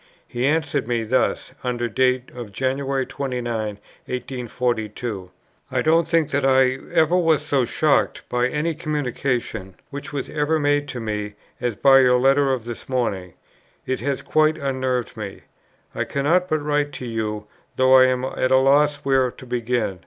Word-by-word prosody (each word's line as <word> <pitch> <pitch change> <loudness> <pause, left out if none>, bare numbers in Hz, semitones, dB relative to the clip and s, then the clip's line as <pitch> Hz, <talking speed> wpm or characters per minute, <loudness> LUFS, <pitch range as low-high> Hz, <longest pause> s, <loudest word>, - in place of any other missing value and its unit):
He 120 +2 -1
answered 155 -4 0
me 120 -2 0
thus, 120 +4 0
under 120 -1 -1
date 125 +2 +1
of 120 -4 -8
Jan. 130 +6 -1
29, 135 -2 -3
1842: 115 -1 -4 0.4
"I - - +1
don't 165 +1 +3
think 165 -3 +1
that 140 0 0
I 130 -1 +3
ever 160 +2 +3
was 160 -4 +2
so 140 -4 +1
shocked 150 +3 +1
by 125 0 +1
any 150 +5 -1
communication, 135 - -3 0.2
which 140 0 -7
was 140 -2 -3
ever 150 +1 0
made 145 0 +1
to 125 - -5
me, 105 -2 -4 0.3
as 120 -3 -1
by 135 +5 +6
your 125 -1 +5
letter 135 +1 +3
of 125 -4 -2
this 120 +1 -8
morning. 100 -9 -2 0.5
It 130 - -2
has 140 +2 -2
quite 155 0 +2
unnerved 130 -4 -2
me.... 105 -3 -7 0.5
I - - -2
cannot 165 +6 +1
but 155 -1 0
write 145 0 0
to 125 - -6
you, 110 -2 -3 0.3
though 130 0 +5
I 130 0 +8
am 130 0 0
at 130 -1 -1
a 130 - +5
loss 145 +2 +4
where 135 -2 +3
to 130 - -13
begin.... 120 -5 -1
130 Hz, 165 wpm, -22 LUFS, 120-145 Hz, 0.5 s, I